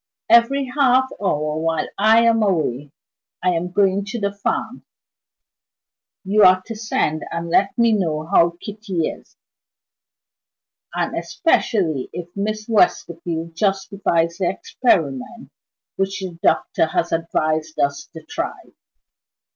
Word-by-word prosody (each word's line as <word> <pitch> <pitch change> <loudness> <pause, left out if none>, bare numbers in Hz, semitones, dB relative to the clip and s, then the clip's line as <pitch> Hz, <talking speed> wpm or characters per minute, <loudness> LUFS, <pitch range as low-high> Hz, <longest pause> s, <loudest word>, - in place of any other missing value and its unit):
"Every 270 +4 +5
half 260 -1 +3
hour 155 -5 -1
while 165 0 -1
I 220 +3 +5
am 230 -1 +3
away 150 - 0 0.5
(I 180 - +3
am 175 +1 -2
going 195 +1 +2
to 215 +4 -5
the 200 -1 -1
farm) 205 - -3 1.4
you 205 +2 +2
are 185 0 +7
to 225 - -6
send 210 -8 -1
and 170 0 -4
let 195 +3 +2
me 235 -1 +4
know 160 -7 0
how 170 -1 +3
Kitty 200 -5 -3
is - - -13 1.6
and - - -1
especially 175 - 0
if 175 -1 -6
Miss 215 +1 -3
Westerfield 170 -6 0
justifies 195 -3 0
the 185 - +1
experiment 185 - -1 0.5
which 195 0 -1
the 185 -3 -6
doctor - - +2
has 165 +1 -1
advised 155 -1 -1
us 140 0 0
to 160 -2 -10
try." - - -6
185 Hz, 125 wpm, -21 LUFS, 165-215 Hz, 1.6 s, are